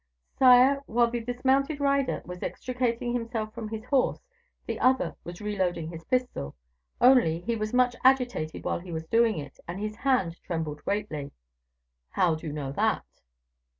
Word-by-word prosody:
"Sire, 260 +2 +6
while 235 +1 +2
the 240 - -1
dismounted 265 +5 0
rider 280 -1 +1
was 180 0 -8
extricating 245 -1 -2
himself 230 -2 -3
from 230 -2 -6
his 220 0 -5
horse, 260 - 0 0.4
the - - -4
other 260 +1 +2
was 175 +2 -9
reloading 185 -6 -1
his 165 -1 -9
pistol. 250 - -2 0.4
Only, 245 -11 +5
he 230 +5 -1
was 215 -1 -3
much 250 0 +3
agitated 250 -11 +2
while - - -1
he 175 0 -10
was 160 -1 -4
loading 230 -4 +4
it, 145 -2 -8
and 175 +3 -5
his 215 +1 -4
hand 230 -11 0
trembled 160 -4 -4
greatly." 195 -9 -2 0.8
"How 175 - +2
do 160 +1 -6
you - - -3
know 145 -2 -4
that?" - - 0
225 Hz, 160 wpm, -27 LUFS, 170-250 Hz, 0.8 s, Sire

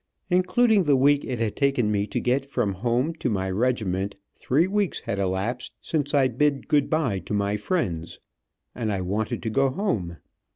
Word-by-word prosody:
Including 205 +2 +3
the 145 -2 +4
week 140 +2 +4
it 125 - -3
had 110 -2 -1
taken 135 -6 +1
me 100 0 0
to - - -2
get 130 +2 +1
from 120 -7 -1
home 120 - 0
to - - 0
my 95 -3 -1
regiment, 100 -3 -1 0.2
three 150 +7 +1
weeks 200 0 -1
had 100 - -3
elapsed 100 +6 -2
since 145 -2 -1
I 135 -2 +5
bid 140 +3 0
good 145 -2 +2
bye 140 -12 +1
to 95 +4 -4
my 100 0 0
friends, 100 - -2 0.5
and 110 -3 -2
I 100 -2 -1
wanted 105 +6 -2
to 110 - -2
go 135 +4 +3
home. 110 - -2
125 Hz, 180 wpm, -25 LUFS, 100-145 Hz, 0.5 s, I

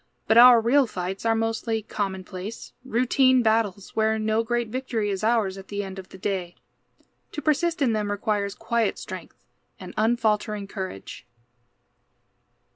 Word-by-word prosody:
But 225 +1 +6
our 245 -1 +9
real 255 +4 +3
fights 190 +2 -4
are 225 - +3
mostly 225 0 -1
commonplace, 195 0 -5
routine 255 +1 +3
battles, 220 -3 0
where 220 0 +2
no 220 +1 +1
great 240 0 -1
victory 230 -4 -2
is 195 +1 -4
ours 215 -4 +1
at 190 - -12
the 205 0 -3
end 190 0 -7
of 190 - -11
the - - -12
day. 185 -2 -3 0.8
To - - -4
persist 310 +2 +1
in 240 -4 +2
them 210 -1 -1
requires 205 0 -1
quiet 230 -3 -1
strength - - -9 0.3
and - - -9
unfaltering 215 -2 +1
courage. 185 - -7
220 Hz, 145 wpm, -25 LUFS, 200-235 Hz, 0.8 s, our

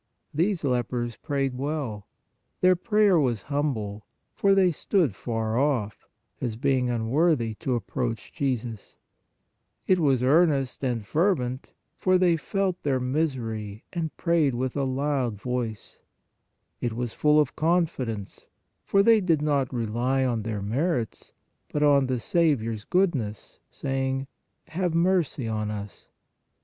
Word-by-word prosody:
These 175 +3 0
lepers 120 -2 -1
prayed 135 -3 -2
well. 135 -7 -3 0.5
Their 185 0 +5
prayer 210 -1 +3
was 120 -7 0
humble, 110 -8 -2 0.3
for 195 -1 +3
they 185 -2 +4
stood 165 - +1
far 115 0 -2
off, 120 -8 -1 0.3
as 120 -4 -2
being 130 0 +1
unworthy 120 +1 +1
to 130 - -1
approach 115 0 -3
Jesus; 120 -6 -3 0.9
it 185 -1 +3
was 135 -6 +2
earnest 140 -2 +2
and 120 -5 -1
fervent, 130 - 0 0.3
for 185 0 +3
they 180 -2 +4
felt 185 +2 -2
their 135 -3 +1
misery 120 -7 -2
and 165 -3 -3
prayed 165 -7 +2
with 130 +1 -2
a 140 -1 0
loud 130 -5 -1
voice; 120 -2 -4 0.8
it 120 -2 -2
was 120 0 -3
full 150 0 +4
of 150 - +1
confidence, 155 - -1 0.4
for 200 0 +3
they 225 0 +5
did 165 -5 +1
not 140 -4 +1
rely 125 +3 0
on 120 -3 0
their 105 -2 -4
merits, 125 - -2 0.4
but 150 - 0
on 140 -2 +4
the 130 -1 -1
Saviour 140 -5 +1
s 105 -1 -8
good 185 -1 +2
ness, 110 -6 -5
saying: 135 0 -2 0.4
"Have 175 0 -1
mercy 170 -7 +1
on 110 -1 -2
us." 105 -1 -7
135 Hz, 135 wpm, -26 LUFS, 115-160 Hz, 0.9 s, Their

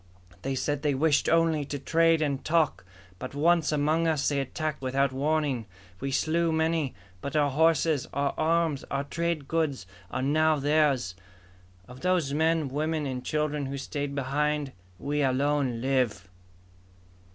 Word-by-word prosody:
They 135 0 -2
said 145 +2 -1
they 145 -3 +1
wished 150 +1 +2
only 165 -2 +3
to 145 - -4
trade 165 +3 +3
and 140 -3 -2
talk, 155 - +1 0.4
but - - -7
once 165 +2 +3
among 155 +3 +1
us 155 -4 +1
they 140 -1 +1
attacked 150 +2 -3
without 135 +1 +1
warning! 140 -4 0 0.3
We 135 - -3
slew 165 +4 +1
many, 160 -3 0 0.3
but 140 - -5
our 145 -2 +3
horses, 160 -1 +2
our 140 0 0
arms, 160 -2 +1
our 140 0 -1
trade 165 -1 -2
goods, 155 - -1 0.2
are 130 - -3
now 155 +3 +3
theirs! 145 -8 +2 0.7
Of 125 +1 -12
those 175 -5 +1
men, 160 0 +2
women, 155 +3 -1
and 130 -2 -4
children 150 -1 -1
who 140 +1 -4
stayed 140 +1 -4
behind, 145 +1 -1 0.3
we 145 +7 -2
alone 135 -2 +1
live!" 125 -8 0
145 Hz, 150 wpm, -27 LUFS, 135-160 Hz, 0.7 s, only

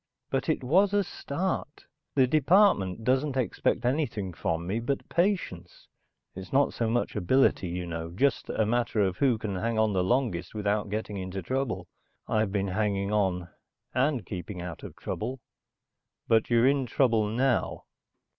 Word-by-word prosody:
But - - -1
it - - 0
was 190 +10 +3
a 205 - +3
start. 170 -2 -4 0.3
The 135 -2 +5
department 140 - +3
doesn't 130 +3 +1
expect 120 -1 0
anything 120 - -1
from 85 -1 -2
me 100 +6 -1
but 135 +4 -2
patience. 170 - -1 0.5
It's 95 0 -9
not 140 +1 +3
so 115 -1 -1
much 120 +1 0
ability, 115 -1 +2
you 90 +1 -3
know, 85 -1 -5
just 125 +9 0
a 110 - +1
matter 115 -1 +1
of 95 -2 +1
who 130 -5 +3
can 105 -3 -4
hang 115 +4 -1
on 110 -1 +2
the 90 -1 +2
longest 110 -4 0
without 105 0 0
getting 105 0 -3
into 95 0 -5
trouble. 130 +4 -2 0.4
I've 110 -2 +1
been 100 -1 -1
hanging 100 0 0
on, 95 -4 0 0.4
and 130 -4 +1
keeping 90 +1 -6
out 85 -2 -6
of - - -9
trouble." 130 +1 -4 0.9
"But 110 -1 +3
you're 120 0 +4
in 135 -2 +2
trouble 115 -3 +2
now." 125 +3 0
110 Hz, 160 wpm, -28 LUFS, 95-130 Hz, 0.9 s, The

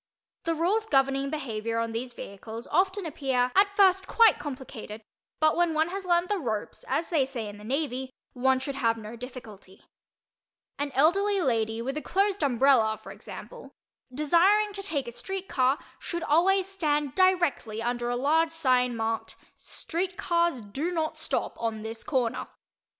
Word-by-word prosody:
The 330 0 +1
rules 400 +7 +1
governing 275 -2 +2
behavior 230 -6 -3
on 230 0 -1
these 240 +3 -4
vehicles 220 +1 -8
often 380 +3 +1
appear 265 -5 0
at 400 +1 +4
first 380 -1 +4
quite 455 -3 +5
complicated, 245 -6 -7 0.4
but 310 0 +4
when 345 -2 +2
one 315 +2 +2
has 385 +1 -5
learned 345 0 +2
the 410 0 0
"ropes," 220 -8 -4
as 330 - -1
they 310 -5 +3
say 255 -5 -5
in 205 0 -9
the - - -12
Navy, 265 +1 -2 0.2
one 265 +1 +2
should 265 +2 -4
have 230 -4 +1
no 220 +1 -8
difficulty. 225 -6 -11 1.0
An 285 0 -1
elderly 390 +8 +3
lady 230 -6 0
with 270 +3 -3
a - - -2
closed 395 +2 0
umbrella, 245 -5 +3
for - - -11
example, - - -10 0.4
desiring 360 +10 +3
to 395 - -5
take 310 -10 -3
a - - -5
street 385 +9 -6
car, 260 +1 +2 0.2
should 340 -1 -4
always 365 +5 +3
stand 300 -8 -1
directly 345 - +2
under 240 +1 -1
a 245 - 0
large 310 +6 +2
sign 255 -6 +1
marked 225 0 -2 0.2
"Street 360 +2 -4
Cars 340 -7 +1
Do 265 +11 -3
Not 320 -3 -1
Stop - - -2
On 220 -2 -2
This 225 0 -5
Corner." 255 -4 -1
280 Hz, 165 wpm, -27 LUFS, 240-345 Hz, 1.0 s, quite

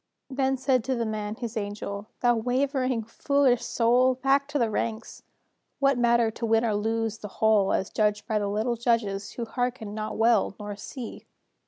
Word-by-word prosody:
Then 265 0 +1
said 260 -2 +1
to 260 -1 0
the 235 -1 -1
man 215 -1 -3
his 235 -1 -6
angel: 205 -1 -4
"Thou 240 -1 +4
wavering, 255 0 0
foolish 255 +2 +1
soul, 250 +2 +3
Back 275 +2 +2
to 295 0 -2
the 235 -4 +1
ranks! 225 +1 -3 0.6
What 275 0 +3
matter 235 -2 +3
To 230 - -4
win 225 +1 +3
or - - +1
to - - 0
lose 225 0 -1
the 210 - -6
whole, 215 -3 +3
"As 190 - -1
judged 210 -1 +1
by 215 -1 +1
the 205 - -1
little 215 +4 0
judges 225 -4 -1
Who 235 - -4
hearken 245 -3 -3
not 215 0 -4
well, 225 -3 +3
nor 205 -1 -5
see? 235 +3 -8
230 Hz, 185 wpm, -26 LUFS, 215-255 Hz, 0.6 s, Thou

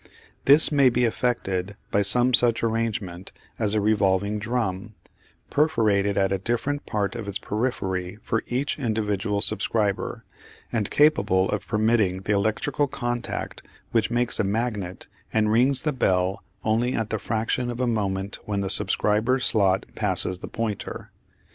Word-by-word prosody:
This 145 +4 +8
may 140 -3 +5
be 125 +1 0
effected 100 -5 -1
by 100 - +2
some 120 +5 +4
such 120 -2 +4
arrangement 110 -5 -2 0.3
as 110 -2 0
a - - +3
revolving 100 -1 +1
drum, 110 -2 -3 0.6
perforated 105 -10 +2
at 95 -1 +2
a 95 - 0
different 120 +8 -2
part 105 0 -1
of 115 -4 -6
its 100 - -2
periphery 95 -5 -3
for 110 - -1
each 135 +5 -2
individual 105 -4 -1
subscriber, 105 -2 0 0.5
and 110 -4 -1
capable 145 -12 +3
of 105 - -3
permitting 105 -4 +1
the 105 - 0
electrical 110 +8 0
contact 120 -2 -4 0.3
which 115 -2 +1
makes 120 0 0
a - - +3
magnet 105 -3 -3 0.3
and 110 -1 +1
rings 130 +4 +3
the 150 - 0
bell 95 -6 0 0.2
only 115 +3 +1
at 110 -1 -2
the 110 - -1
fraction 115 +3 -1
of 120 0 -5
a 130 - +1
moment 100 -4 -2
when 100 -1 -2
the 95 -1 -1
subscriber's 105 +5 +1
slot 95 -3 +2
passes 95 -3 -1
the - - -7
pointer. 110 -3 -5
110 Hz, 150 wpm, -24 LUFS, 100-120 Hz, 0.6 s, This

